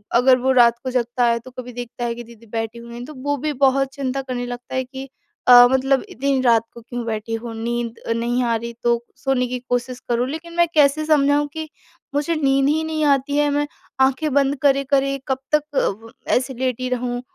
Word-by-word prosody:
अगर 255 +1 +6
वो 265 +1 +2
रात 235 -2 +5
को 260 - -2
जगता 245 0 0
है 235 0 +2
तो 255 +2 -13
कभी 250 0 -8
देखता 245 0 -6
है 235 0 -2
कि 240 - -7
दीदी 230 0 -16
बैठी 225 0 -3
हुई 235 +1 -9
तो 305 - -10
वो 285 0 0
भी 305 +3 -2
बहुत 270 0 +4
चिंता 270 -1 -2
करने 250 -2 -4
लगता 245 +1 -7
है 260 - +1
कि 265 +1 -9 0.4
अ, 245 0 +10
मतलब 265 0 +2
इतनी 275 +2 0
रात 230 -3 +4
को 235 - -11
क्यों 240 0 -6
बैठी 220 0 -3
हूँ 225 0 -4
नींद 235 +1 -3
अ, - - -1
नहीं 240 +2 0
आ 235 -1 +1
रही 235 +1 -4
तो 235 0 +2
सोने 265 -2 0
की 250 0 -4
कोशिश 245 0 -1
करूँ। 240 +1 +1
लेकिन 330 +3 -7
मैं 345 0 +4
कैसे 300 0 +3
समझाऊँ 290 -1 +3
कि 315 -1 -5 0.5
मुझे 300 +3 0
नींद 275 -2 +2
ही 315 +2 +1
नहीं 315 -1 -2
आती 280 0 +2
है। 295 0 +3
मैं 290 0 0 0.3
आँखें 270 +3 +2
बंद 280 0 +3
करे-करे 275 -1 +2
कब 265 -1 0 0.2
तक 300 - +1 0.4
व 225 - -12 0.2
ऐसे 265 +1 0
लेटी 255 0 -2
रहूँ 245 -1 -2
255 Hz, 215 wpm, -21 LUFS, 240-275 Hz, 0.5 s, अ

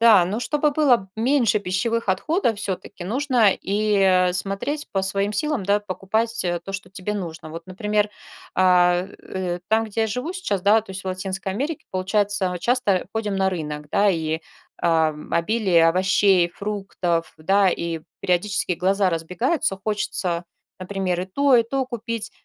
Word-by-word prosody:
Да, 220 -6 +7
но 205 +6 -3
чтобы 295 +2 +1
было 255 -10 +2
меньше 235 -2 +2
пищевых 205 +4 -1
отходов 230 - +1
всё-таки 190 -1 -5
нужно 240 -1 +3
и, 210 +1 0
э, 185 -2 +4
смотреть 200 +12 -2
по 195 -1 0
своим 195 +2 0
силам, 300 -9 -1
да, 205 +2 +2
покупать 220 +4 -1 0.2
то, 195 - -6
что 195 -1 -5
тебе 190 +2 -5
нужно. 165 -5 -6
Вот, 165 +2 -8
например, 210 +3 0 0.5
а, 180 -1 +4 0.2
э, 180 -2 -4
там, 225 +1 +3
где 220 +1 -2
я - - +2
живу 250 - -3
сейчас, 210 - -2
да, 215 +2 +5
то 210 - -13
есть 190 - -6
в - - -8
Латинской 190 +1 -3
Америке 295 +8 -3
получается 195 +1 0
мы 180 - -4
часто 210 -6 +1
ходим 210 -3 -2
на 190 0 +2
рынок, 150 -4 -5
да. 205 0 +3
И, 160 -3 0 0.4
а, 160 -2 +2 0.2
обилие 175 -2 +3
овощей, 185 0 +3
фруктов, 190 -3 -3
да, 195 +5 +3
и 170 -2 -2 0.2
периодически 185 +1 0
глаза 190 +2 +1
разбегаются, 190 - -1
хочется, 190 -5 -1 0.3
например, 185 -1 -2
и 185 - -4
то, 280 +8 +3
и 235 - +6
то 265 +3 -2
купить. 230 -1 -5
195 Hz, 160 wpm, -23 LUFS, 180-225 Hz, 0.5 s, Да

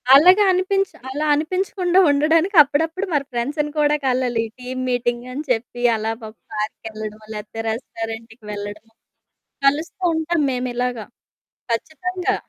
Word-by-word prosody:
అలాగా 365 +8 +7
అనిపించి 385 +1 +1
అలా 295 +3 -2
అనిపించకుండా 365 +3 +1
ఉండడానికి 320 +6 +2
అప్పుడప్పుడు 325 +7 -1
మన 290 - +3
ఫ్రెండ్స్‌ని 290 +5 -1
కూడా 295 0 +4
కలలి. 250 -3 +1 0.2
టీమ్ 255 +1 -5
మీటింగ్ 240 0 -1
అని 295 +3 -4
చెప్పి, 240 +1 -2
అలా 220 +1 -1
పా 215 - -6 0.2
పార్క్‌కెళ్ళడం, 215 0 -5
లేకపోతే 210 +2 -6
రెస్టారెంట్‌కి 225 -1 -6
వెళ్లడమో, 205 +2 -7 0.7
కలుస్తూంటాం 320 +2 +1
మేము 250 0 -2
ఇలాగా 245 -3 -2 0.7
ఖచ్చితంగా. 360 +9 -1
260 Hz, 115 wpm, -21 LUFS, 225-325 Hz, 0.7 s, అలాగా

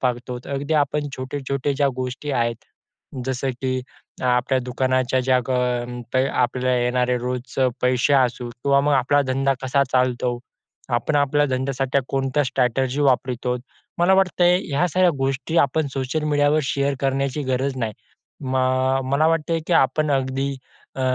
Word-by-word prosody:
पाहतो 125 -1 -2
अगदी 140 +3 -2
आपण 145 0 +1
छोटे-छोटे 140 +1 -3
ज्या 140 0 +2
गोष्टी 130 +3 -4
आहेत, 120 -2 0 0.7
जसं 130 +1 -1
की 130 - 0 0.5
आपल्या 125 +1 +2
दुकानाच्या 130 0 0
ज्या 130 0 +2
ज्या 125 +1 -2
अ, 125 -1 0 0.3
क - - 0
अ, 130 +1 +3
आपल्याला 125 +1 0
येणारे 125 0 +1
रोज 125 +1 -5 0.2
पैसे 125 +2 +2
असू 125 -2 +1
किंवा 140 +3 +1
मग 145 +1 +1
आपला 135 +2 +3
धंदा 135 +1 +1
कसा 135 +2 +2
चालतो. 125 -1 +1 0.6
आपण 145 +5 0
आपल्या 145 +1 +2
धंद्यासाठी 135 0 -1
कोणत्या 135 +2 0
स्ट्रॅटेजी 130 +1 0
वापरतो. 125 -2 0 0.4
मला 175 +2 +4
वाटतंय 180 -2 +3
ह्या 145 +6 +2
साऱ्या 185 +1 +3
गोष्टी 135 +5 -2
आपण 145 +2 -1
सोशल 135 +3 -2
मीडियावर 145 +1 +3
शेअर 140 +1 0
करण्याची 135 +1 -1
गरज 130 +1 0
नाही. 115 -4 -2 0.5
म 130 -2 -2
अ, 130 +1 +2
मला 140 +4 +2
वाटतंय 165 0 0
की - - +1
आपण 155 +3 +1
अगदी 135 +1 0 0.5
अ, - - -4
130 Hz, 150 wpm, -22 LUFS, 125-140 Hz, 0.7 s, मला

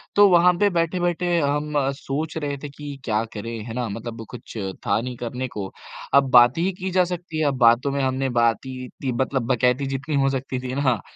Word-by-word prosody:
तो 205 0 +8
वहाँ 180 0 +6
पे 205 - +4
बैठे-बैठे 175 0 0
हम 150 0 -1 0.2
सोच 155 +5 -4
रहे 145 -2 -3
थे 145 - -5
कि 145 0 -8
क्या 110 -1 +1
करें, 115 +2 -5
है 115 - -6
ना? 125 0 -2
मतलब 115 +2 -6
कुछ 120 -1 -10 0.3
था - - +3
नहीं 125 +1 -5
करने 125 +2 -4
को, 100 -6 -6 0.4
अब 140 -1 +5
बातें 120 +5 +6
ही 185 +3 +1
की 190 0 -3
जा 185 0 +4
सकती 170 -2 -5
हैं, 155 - +2
अब 135 -2 0
बातों 120 +3 +4
में 140 0 -1
हमने 130 0 0
बात 115 +1 +2
ही 130 -1 -6
इत्ती 130 +1 -5
मतलब 130 -2 -1
बकैती 125 +3 +2
जितनी 140 +3 -3
हो 135 - +3
सकती 135 -1 -3
थी 125 0 -5
ना, 130 -7 +1
135 Hz, 215 wpm, -23 LUFS, 125-155 Hz, 0.4 s, तो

